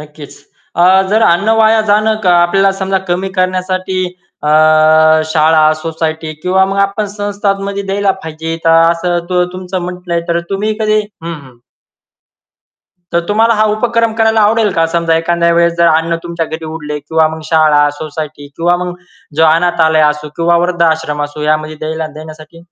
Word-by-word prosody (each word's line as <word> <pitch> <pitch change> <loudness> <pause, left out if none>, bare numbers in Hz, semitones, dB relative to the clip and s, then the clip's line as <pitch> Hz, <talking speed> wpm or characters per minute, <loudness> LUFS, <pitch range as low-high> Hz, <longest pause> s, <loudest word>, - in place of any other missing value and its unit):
नक्कीच. 150 -1 -12 0.4
अ, 175 - +2 0.3
जर 220 +2 +2
अन्न 195 +6 -1
वाया 220 0 +4
जाणं 215 -1 +1
आपल्याला 175 +3 +3
समजा 190 0 0
कमी 185 +2 -1
करण्यासाठी 185 0 -1 0.5
अ, 150 - 0 0.8
शाळा, 155 0 +3
सोसायटी 160 0 -4
किंवा 190 +1 +2
मग 200 - -3
आपण 200 +1 0
संस्थांमध्ये 200 -1 -3
द्यायला 195 0 0
पाहिजे. 160 +1 -5
तर 165 - +4 0.2
असं 175 +1 -1
तू 180 -1 +2
तुमचं 185 0 -5
म्हटलंय 180 -1 -4
तर 170 0 0
तुम्ही 205 +2 -1
कधी 215 0 +2
हं, 170 -5 -8
हं. 130 -5 -14 1.6
तर 170 - +2
तुम्हाला 225 +2 +2
हा 215 - +2
उपक्रम 230 0 0
करायला 220 0 +2
आवडेल 215 0 +2
का? 165 - +2
समजा 170 -1 +1
एखाद्या 170 +1 +1
वेळेस 170 0 +2
जर 170 0 +4
अन्न 165 +1 +1
तुमच्या 170 -1 -3
घरी 160 +1 -7
उरले 150 -2 -6
किंवा 160 +2 +1
मग 160 - -10
शाळा, 155 -2 +3 0.2
सोसायटी 155 -2 -7
किंवा 175 +1 +2
मग 180 -1 -5 0.4
जो 160 - +4
अनाथालय 160 -1 +2
असो 150 0 -5
किंवा 170 +1 +2
वृद्ध 175 -1 -3
आश्रम 150 -2 -4
असो 145 +1 -7
यामध्ये 155 0 -1
द्यायला 160 0 -3
देण्यासाठी. 155 +1 -12
170 Hz, 160 wpm, -13 LUFS, 160-195 Hz, 1.6 s, वाया